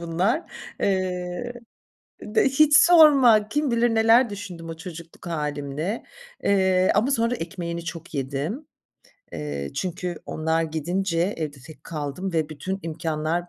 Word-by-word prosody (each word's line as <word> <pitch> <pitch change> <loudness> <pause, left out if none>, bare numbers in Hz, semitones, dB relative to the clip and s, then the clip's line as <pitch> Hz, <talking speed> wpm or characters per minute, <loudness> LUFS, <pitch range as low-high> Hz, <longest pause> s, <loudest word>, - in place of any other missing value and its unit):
bunlar. 180 - 0 0.4
Eee 185 +3 -1 0.7
D 210 +1 +1
hiç 295 +2 +5
sorma, 275 -12 +7
kim 295 -1 0
bilir 235 0 +2
neler 230 +2 +5
düşündüm 185 -5 -8
o 165 - -6
çocukluk 170 0 -10
hâlimle. 150 +4 -3 0.4
Eee, 190 -2 +3
ama 240 +7 +2
sonra 230 -1 +1
ekmeğini 170 -1 -5
çok 165 0 -7
yedim. 145 - -3 0.7
Eee, 70 -2 -4
çünkü 180 -1 -3
onlar 160 +1 0
gidince 170 +4 -1
evde 150 -3 -4
tek 160 - -14
kaldım 160 +4 -4
ve 160 -2 0
bütün 170 +6 -4
imkânlar 160 +1 -2
175 Hz, 125 wpm, -24 LUFS, 160-215 Hz, 0.7 s, sorma